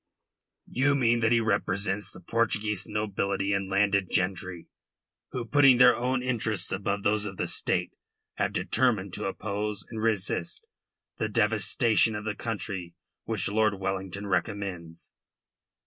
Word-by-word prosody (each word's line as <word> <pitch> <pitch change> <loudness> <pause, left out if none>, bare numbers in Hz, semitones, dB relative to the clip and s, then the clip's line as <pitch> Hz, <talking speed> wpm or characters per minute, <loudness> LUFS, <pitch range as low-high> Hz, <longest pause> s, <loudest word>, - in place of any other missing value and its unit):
"You 140 +3 +2
mean 120 -3 +3
that 115 0 +2
he 120 - +5
represents 100 -1 0
the - - -12
Portuguese 105 -1 0
nobility 100 -2 -1
and 100 -1 -1
landed 100 -1 +2
gentry, 95 -2 -1 0.6
who, 125 -2 -4
putting 135 0 +6
their 125 -1 +7
own 125 +2 -1
interests 110 -7 -1
above 100 +1 -2
those 105 0 +1
of 95 -2 -8
the - - -1
State, - - 0 0.4
have - - 0
determined 110 -6 +1
to - - -3
oppose 105 0 -3
and 110 - -4
resist 100 -6 0 0.5
the 110 - -1
devastation 110 +1 +2
of 105 0 -5
the 105 - -1
country 100 -6 -5 0.3
which - - -1
Lord 110 0 +2
Wellington 95 +1 -4
recommends." 90 -3 -3
105 Hz, 135 wpm, -28 LUFS, 95-115 Hz, 0.6 s, their